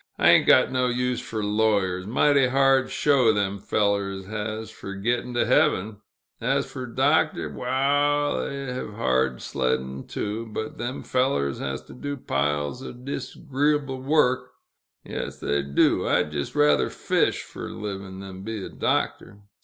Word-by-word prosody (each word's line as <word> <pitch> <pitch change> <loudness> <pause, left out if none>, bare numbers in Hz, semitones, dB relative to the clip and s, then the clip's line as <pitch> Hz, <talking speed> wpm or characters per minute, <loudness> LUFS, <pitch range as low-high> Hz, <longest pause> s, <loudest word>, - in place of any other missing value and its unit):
"I - - +5
ain't - - +5
got - - +6
no 130 -1 +1
use 125 0 0
fer 110 -2 -4
lawyers 105 -3 +1
mighty 135 +3 +4
hard 135 0 +3
show 135 -6 +3
them 100 -1 -1
fellers 100 -2 0
has, 110 +1 -4
fer 100 -2 -8
get'n' 120 +4 -1
to 120 - +2
heaven. 105 +3 +2 0.4
As - - +1
fer 130 -1 -7
doctors 115 - +1
waal, 145 +3 +1
they'll 140 -2 -4
hev 125 -4 -5
hard 65 - 0
sledd'n, 65 +1 -2
too; 110 +2 -4
but 110 +1 -5
them 120 +2 -4
fellers 125 - 0
has 65 0 -4
to - - -13
do 145 +2 -5
piles 75 - -1
o' 135 - -7
dis'gree'bl' 140 +1 -2
work, 135 -3 +2 0.6
they 70 0 -2
do; 70 0 +2
I'd 75 - +2
jist 70 -2 -4
rather 75 -2 +4
fish - - 0
fer - - -8
a - - -7
liv'n', 95 -2 -6
then 95 -1 -9
be 110 -1 -5
a - - -7
doctor! 100 - -2
110 Hz, 150 wpm, -25 LUFS, 95-130 Hz, 0.6 s, got